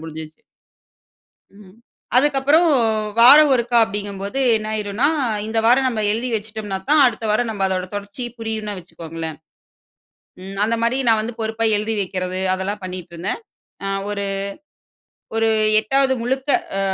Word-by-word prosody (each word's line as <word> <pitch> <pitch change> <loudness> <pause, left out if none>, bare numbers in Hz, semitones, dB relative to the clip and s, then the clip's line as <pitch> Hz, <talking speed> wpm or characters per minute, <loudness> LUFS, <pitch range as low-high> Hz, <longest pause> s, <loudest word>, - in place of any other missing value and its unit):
முடிஞ்சுச்சு. 160 -1 -9 1.2
ம் 185 0 -17 0.4
அதுக்கு 280 +1 +3
அப்புறம் 300 +6 +4 0.5
வாரம் 285 +5 +8
ஒருக்கா 240 -1 0
அப்டிங்கபோது 200 +3 -4 0.2
என்ன 215 0 -6
ஆயிரும்னா, 210 +4 -1 0.4
இந்த 225 +1 -3
வாரம் 260 +3 +4
நம்ப 230 -4 -1
எழுதி 235 +4 -2
வச்சுட்டோம்ன்னாதான் 220 +6 -1
அடுத்த 240 - -1
வாரம் 225 +2 +1
நம்ப 205 -3 -3
அதோட 185 -1 -2
தொடர்ச்சி 205 +4 -6 0.2
புரியுன்னு 220 -2 -3
வச்சுக்கோங்களேன். 165 -2 -7 1.1
ம். 195 +1 -8
அந்த 230 +2 0
மாரி 235 +3 +1
நான் 220 -1 +4
வந்து 225 +2 -5
பொறுப்பா 220 +1 -2
எழுதி 215 +2 -2
வைக்கிறது 185 -1 -3
அதெல்லாம் 195 +2 -4
பண்ணிட்டுருந்தேன். 180 - -5 0.7
ஒரு, 200 -1 -3 1.1
ஒரு 225 0 +2 0.3
8வது 265 +5 +1
முழுக்க 265 +4 -2 0.3
ஆ - - 0
215 Hz, 130 wpm, -20 LUFS, 195-245 Hz, 1.2 s, வாரம்